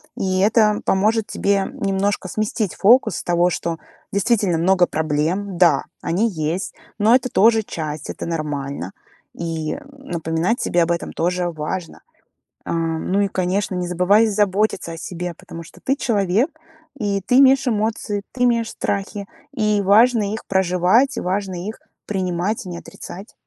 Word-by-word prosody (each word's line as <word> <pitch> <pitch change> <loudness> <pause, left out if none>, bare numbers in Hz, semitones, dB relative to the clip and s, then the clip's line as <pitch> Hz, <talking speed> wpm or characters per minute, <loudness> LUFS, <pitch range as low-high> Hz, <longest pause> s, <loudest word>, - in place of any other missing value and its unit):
И 190 -5 -1
это 210 +1 +3
поможет 215 +3 +2
тебе 200 -1 +1
немножко 195 0 -1
сместить 215 -1 -2
фокус 230 -2 +4
с - - -5
того, 175 0 +2
что 170 -1 -3 0.4
действительно 200 -3 +2
много 180 +1 +3
проблем. 160 +5 -1
Да, 175 -1 +4 0.2
они 205 +7 +1
есть, 165 +2 -3 0.3
но 220 +4 +5
это 255 0 +1
тоже 225 +1 +4
часть, 155 -5 -5
это - - -5
нормально. 145 - -4 0.4
И, 165 -2 -3
э, - - -6
напоминать 175 - -2
себе 175 -1 +2
об 165 - 0
этом 170 - -2
тоже 175 +1 0
важно. 165 +2 -5 0.7
Ам, 165 +1 -2
ну 195 - +2
и, 200 - +2
конечно, 190 +1 -1
не 180 -1 -2
забывай 180 +5 +4
заботиться 205 -3 0
о 165 - -8
себе, 175 +1 -5
потому 170 - -9
что 165 - -16
ты 270 +1 +1
человек, 210 - +1 0.5
и 200 -4 -1
ты 250 +7 +3
имеешь 270 0 +5
эмоции, 215 -2 -1
ты 250 - -2
имеешь 230 -2 +1
страхи. 200 -1 -3 0.3
И 210 -6 +1
важно 210 +1 +4
их 220 - -6
проживать, 190 +8 +2
важно 190 +1 -2
их 220 - -6 0.3
принимать 190 +1 -2
и - - -7
не 175 - -5
отрицать. 190 +3 -10
190 Hz, 155 wpm, -21 LUFS, 170-215 Hz, 0.7 s, но